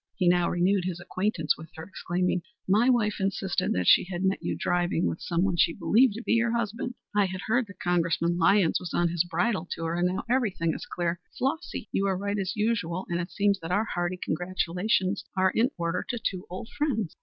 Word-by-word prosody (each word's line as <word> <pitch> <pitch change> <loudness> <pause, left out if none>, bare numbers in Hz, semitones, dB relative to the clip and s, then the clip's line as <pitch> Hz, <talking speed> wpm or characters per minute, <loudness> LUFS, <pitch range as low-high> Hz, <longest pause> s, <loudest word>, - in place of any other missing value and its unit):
He 185 -4 +1
now 175 0 +4
renewed 180 +1 +2
his 180 -2 -3
acquaintance 180 -3 -1
with 155 +1 -11
her, 160 - -7
exclaiming 180 0 -1 0.3
"My 215 +6 +4
wife 220 -5 +2
insisted 195 -1 -1
that 90 0 -1
she - - +6
had 180 0 -4
met 190 +1 +1
you - - -2
driving 175 -1 0
with - - -2
some 170 +1 0
one 190 -3 +1
she 165 - +4
believed 230 0 +3
to 230 - -6
be - - -2
your 235 0 +2
husband. 235 +2 -3 0.2
I 205 -1 +4
had 185 0 -4
heard 245 +2 +1
that 200 - -14
Congressman 170 -1 +1
Lyons 185 0 +4
was 180 - -5
on 175 0 +2
his 170 0 +1
bridal 185 0 -1
tour, 165 0 -3
and 175 +1 +1
now 185 +1 -2
everything 210 -10 +1
is - - -7
clear. 175 0 -2 0.2
Flossy, 275 -4 -2
you 195 - 0
were 190 -2 +1
right 200 +1 -2
as 190 -1 -2
usual, 210 -5 -1
and 170 0 -1
it 175 +1 -3
seems 200 -1 +1
that 165 - -7
our 205 +4 +2
hearty 175 +1 -1
congratulations 185 +3 -1
are 185 0 +4
in 235 +3 +2
order 170 +1 -1
to 245 - -1
two 185 -4 -3
old 185 +5 -7
friends." 225 - -1
185 Hz, 215 wpm, -27 LUFS, 175-210 Hz, 0.3 s, she